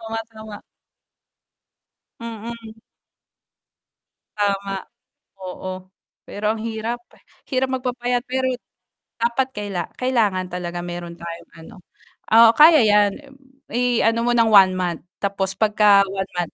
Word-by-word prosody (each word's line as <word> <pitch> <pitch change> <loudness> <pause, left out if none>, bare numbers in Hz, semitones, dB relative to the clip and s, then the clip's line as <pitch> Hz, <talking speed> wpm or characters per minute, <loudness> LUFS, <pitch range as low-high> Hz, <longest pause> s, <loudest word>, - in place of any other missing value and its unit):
Oo 225 - -9
nga, 225 - -1
tama. 220 -2 -10 1.6
Mm. 230 0 -8 1.6
Tama. 200 -1 -1 0.7
Oo. 185 0 -7 0.4
Pero 210 +1 -1
ang 220 - -7
hirap, 230 +1 -4 0.5
hirap 260 -1 0
magpapayat 245 -1 -2
pero 260 0 0 0.7
dapat 235 +3 +1
kaila 205 -5 -4 0.2
kailangan 215 -8 +1
talaga 175 -1 -5
mayro'n 175 -1 -6
tayong 170 0 -9
ano. 195 +8 -13 0.6
Oo, 230 0 +9
kaya 310 -2 +8
'yan. 210 -1 +4 0.6
I-ano 235 -1 +1
mo 240 - +2
ng 230 -2 +3
1 195 -3 +7
month 180 -3 -2 0.2
tapos 195 -1 -1
'pagka 210 -1 +5
1 195 0 -4
month 175 -2 -2
215 Hz, 115 wpm, -21 LUFS, 190-235 Hz, 1.6 s, Oo